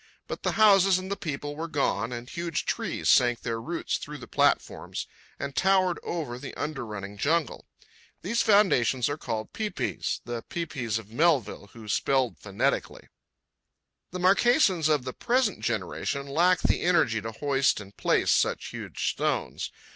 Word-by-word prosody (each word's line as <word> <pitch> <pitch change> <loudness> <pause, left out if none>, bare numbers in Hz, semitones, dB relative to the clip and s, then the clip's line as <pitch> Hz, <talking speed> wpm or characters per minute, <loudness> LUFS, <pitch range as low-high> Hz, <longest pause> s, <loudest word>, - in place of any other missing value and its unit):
But - - -5
the - - 0
houses 195 -3 +6
and 185 +1 -6
the - - 0
people 145 -4 -5
were 165 +2 -4
gone, 125 -7 0
and 120 0 -6
huge 170 +2 -3
trees - - -2
sank 120 -1 +4
their 115 -1 -3
roots 165 +8 -3
through 150 0 -7
the - - -11
platforms - - 0 0.3
and 140 -1 -5
towered 190 -2 +3
over 145 -8 -4
the 135 - -8
under 150 -4 -4
running 100 -1 -7
jungle. 155 +1 0 0.6
These 230 +7 +1
foundations 135 - +3
are 145 - -2
called 110 -3 -4
pae 215 -1 -2
paes—the 120 - -3
pi 170 -1 -2
pis 120 -8 -3
of 110 -1 -10
Melville, 135 - +1
who 115 -2 -11
spelled 130 +3 +1
phonetically. 110 +7 -2 1.0
The 180 - -6
Marquesans 190 - +4
of 150 -4 +2
the 130 0 -5
present 245 -4 +1
generation 120 +5 -2
lack 170 +6 +3
the - - +1
energy 160 -11 +2
to 115 +2 -5
hoist 135 0 +1
and 100 -1 -12
place - - +2
such - - +1
huge - - -3
stones. - - -2
145 Hz, 160 wpm, -27 LUFS, 120-175 Hz, 1.0 s, houses